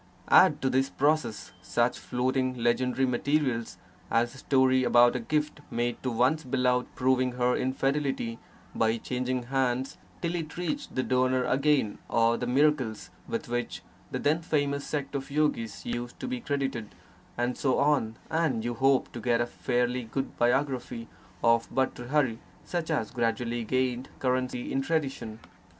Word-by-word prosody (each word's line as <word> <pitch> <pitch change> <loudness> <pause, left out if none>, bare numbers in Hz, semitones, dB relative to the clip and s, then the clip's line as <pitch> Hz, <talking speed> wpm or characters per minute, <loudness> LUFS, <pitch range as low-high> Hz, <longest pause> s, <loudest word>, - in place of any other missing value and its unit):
Add - - +6
to 135 - +3
this 135 +1 +2
process 145 -6 0
such - - 0
floating 130 +1 0
legendary 125 +2 +1
materials 130 -2 0 0.3
as 120 +1 +2
the 135 - -12
story 130 -1 +3
about 120 0 +5
a - - 0
gift 150 +5 -1
made 120 0 -2
to 130 - -1
one's 125 +7 +2
beloved 125 -1 +1
proving 130 0 +2
her 125 0 +1
infidelity 135 -3 -1 0.3
by 115 0 +1
changing 125 +1 -2
hands 130 0 0 0.2
till 170 0 -2
it 165 -2 -4
reached 280 +12 -3
the 130 - +1
donor 130 0 +2
again, 135 -5 +2
or 115 0 +3
the 125 - -3
miracles 130 -4 +1 0.2
with - - -3
which 120 +1 -3 0.3
the - - -3
then 155 +3 +1
famous 145 -3 -1
sect 145 -2 -3
of 135 -1 -4
yogis 140 -7 -1
used 120 0 -4
to - - -4
be 255 -1 -3
credited 135 - -3 0.4
and 120 +1 0
so 130 -3 +1
on, 140 -6 +2
and 155 -9 0
you 120 - -1
hope 135 +2 +2
to 120 - -7
get 120 0 +2
a 120 - +2
fairly 125 +1 -1
good 135 +4 -4
biography 125 -2 0 0.3
of 115 0 +3
Bhartr 130 -2 -1
hari 135 -6 +1 0.3
such 170 -2 -3
as 130 -9 -1
gradually 120 0 -1
gained 130 +1 -1
currency 130 -1 -1
in 135 - +1
tradition. 135 -7 -2
130 Hz, 155 wpm, -28 LUFS, 120-140 Hz, 0.4 s, Add